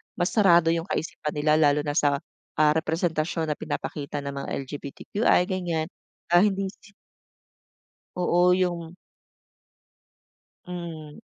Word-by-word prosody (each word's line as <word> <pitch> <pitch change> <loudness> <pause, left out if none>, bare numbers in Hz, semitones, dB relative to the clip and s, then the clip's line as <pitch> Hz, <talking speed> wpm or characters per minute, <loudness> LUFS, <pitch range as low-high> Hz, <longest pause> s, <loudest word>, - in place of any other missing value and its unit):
mas 175 - 0
sarado 175 -6 +5
yung 165 +1 -1
kaisipan 155 -4 -3
nila 150 +1 +3
lalo 145 -1 +3
na 145 - -1
sa, 145 -3 +3 0.4
ah, 155 -1 +4
representasyon 160 0 -1
na 150 - -4
pinapakita 145 -1 -4
ng 140 - -4
mga - - -6
LGBTQI, 145 - 0
ganyan. 170 -4 -1 0.4
Ah, 175 - +7
hindi 195 -2 0
si 200 0 -20 1.2
Oo, 180 0 +3
yung 175 -2 -1 1.7
Hmm. 165 -4 -7
165 Hz, 115 wpm, -26 LUFS, 150-180 Hz, 1.7 s, Ah